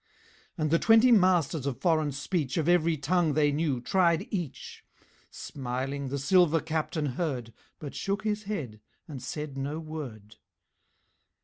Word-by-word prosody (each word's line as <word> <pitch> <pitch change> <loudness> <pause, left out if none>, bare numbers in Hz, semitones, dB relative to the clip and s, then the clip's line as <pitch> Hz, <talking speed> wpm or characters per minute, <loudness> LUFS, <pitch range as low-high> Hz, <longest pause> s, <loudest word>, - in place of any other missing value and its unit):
And 155 -2 -1
the 165 - +4
twenty 225 +2 +6
masters 175 - +3
of 135 - -3
foreign 155 -4 +2
speech 145 0 -2
Of 160 -1 0
every 170 -2 +3
tongue 165 +1 +1
they 150 -1 +3
knew 145 -3 0
tried 175 - +2
each; 175 - -5 0.5
Smiling, 135 +1 -4
the 140 +2 -3
silver 165 +3 +4
Captain 155 0 -2
heard, 130 -5 -3 0.2
But 145 -3 -8
shook 200 +1 -2
his 210 -1 -2
head 145 - -4 0.3
and 140 -6 -7
said 140 +1 -5
no 145 +3 -3
word. 130 -10 -8
155 Hz, 140 wpm, -28 LUFS, 140-175 Hz, 0.5 s, twenty